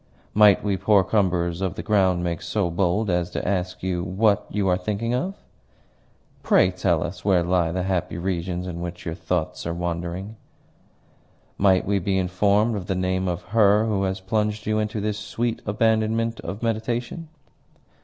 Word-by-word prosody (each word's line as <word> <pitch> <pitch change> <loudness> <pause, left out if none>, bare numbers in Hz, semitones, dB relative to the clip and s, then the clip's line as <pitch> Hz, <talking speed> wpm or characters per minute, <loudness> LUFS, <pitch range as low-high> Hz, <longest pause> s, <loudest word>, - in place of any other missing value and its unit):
"Might 105 -2 +6
we 100 -2 0
poor 100 +1 +4
cumberers 90 -3 0
of 95 -3 -1
the - - -5
ground 95 -4 +2
make 85 -1 -2
so 100 -5 -1
bold 95 +4 +1
as 90 0 0
to - - -4
ask 90 -2 -2
you 90 -2 -1
what 100 +3 +1
you 100 -2 -1
are 90 - +3
thinking 105 +5 -2
of?" 180 +11 -1 1.1
"Pray 90 - +4
tell 90 -3 +1
us 90 +2 -6
where 95 -4 +3
lie 85 -1 +1
the 90 +1 -2
happy 90 -2 -2
regions 90 0 -2
in 85 -2 -5
which 90 0 -6
your 80 - -3
thoughts 90 -1 -3
are 85 - -2
wandering?" 85 +4 -4 1.2
"Might 95 -2 +4
we 100 0 +1
be 95 +1 0
informed 100 +4 +2
of 95 -3 -5
the 95 - -1
name 95 0 -1
of 90 0 -3
her 105 -1 +5
who 105 -3 0
has 95 0 -2
plunged 105 +2 -1
you 110 0 +1
into 105 0 -2
this 105 0 -2
sweet 115 +3 -3
abandonment 110 +2 +1
of 100 +4 -6
meditation?" 120 +7 -2
95 Hz, 175 wpm, -24 LUFS, 90-105 Hz, 1.2 s, Might